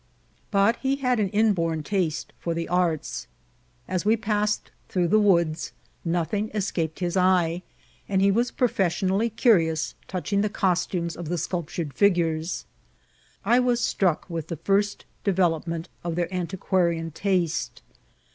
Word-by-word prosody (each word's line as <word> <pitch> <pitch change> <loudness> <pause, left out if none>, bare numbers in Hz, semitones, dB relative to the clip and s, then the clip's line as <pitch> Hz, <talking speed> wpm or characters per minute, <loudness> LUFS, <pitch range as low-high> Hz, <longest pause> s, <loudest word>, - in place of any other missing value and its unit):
But 205 +3 +3
he 270 0 0
had 250 -4 +1
an 200 -2 +1
inborn 180 -7 +1
taste 175 -4 -1
for 170 -1 -2
the 165 0 -2
arts. 175 - -1 0.6
As 185 0 -1
we 220 +2 +3
passed 210 -1 -1 0.2
through 175 -2 +1
the 215 - +5
woods, 170 -6 +2 0.3
nothing 175 +5 -1
escaped 175 -5 -2
his 175 0 -1
eye, 180 -2 +3 0.5
and 195 -1 +2
he 195 +1 +4
was 235 +4 +1
profes* 195 -8 +1
sionally 200 +4 +1
curious 165 - +3
touching 200 +2 -1
the 210 - +1
costumes 180 -3 0
of 175 -3 -6
the 175 - -1
sculptured 170 -3 -3
figures. 170 -4 +1 0.8
I 240 +2 +5
was 245 -1 +2
struck 185 -8 +1
with 165 -3 -4
the 165 - -4
first 200 +5 0 0.2
development 170 -3 0 0.2
of 170 -1 -2
their 175 +1 -2
antiquarian 175 -2 0
taste. 180 -1 -1
180 Hz, 140 wpm, -25 LUFS, 165-205 Hz, 0.8 s, the